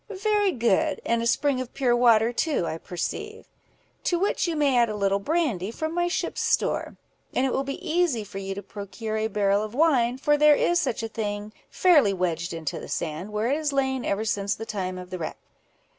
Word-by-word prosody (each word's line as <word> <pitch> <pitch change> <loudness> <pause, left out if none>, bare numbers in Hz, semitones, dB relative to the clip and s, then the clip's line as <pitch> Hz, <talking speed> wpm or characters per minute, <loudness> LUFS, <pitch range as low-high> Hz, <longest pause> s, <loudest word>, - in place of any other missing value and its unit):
"Very 415 -2 +3
good; 275 +4 +1
and 235 0 +1
a 230 - 0
spring 270 +2 +1
of 255 - -8
pure 255 -3 +2
water 235 -1 +4
too, 290 - 0
I 160 0 -4
perceive." 420 - -5 0.6
"To 350 - +2
which 385 0 0
you 335 - -1
may 285 -3 +2
add 235 -2 +4
a 215 - -3
little 200 -1 +1
brandy, 245 - 0
from 315 +7 -4
my 350 0 +1
ship's 350 - -2
store; - - 0 0.4
and 255 - +2
it 265 - 0
will 270 - 0
be 275 0 -6
easy 320 -9 +1
for 195 -1 -8
you 195 0 -4
to 200 - -6
procure 215 +3 -5
a 220 0 0
barrel 205 -2 +1
of 215 +2 -5
wine, 255 -6 +3
for 295 +2 +2
there 300 0 +6
is 345 +3 +2
such 240 -5 -1
a - - -1
thing, 210 -1 -4 0.2
fairly 295 - +4
wedged 175 -2 -1
into 160 -3 -4
the - - -9
sand, 170 +5 -3
where 215 +4 0
it 285 - +2
has 305 -2 -2
lain 265 -2 0
ever 205 +1 -1
since 200 -2 0
the 225 - -7
time 185 -4 -3
of 180 0 -9
the 185 - -4
wreck." 160 - -4
235 Hz, 220 wpm, -25 LUFS, 200-295 Hz, 0.6 s, there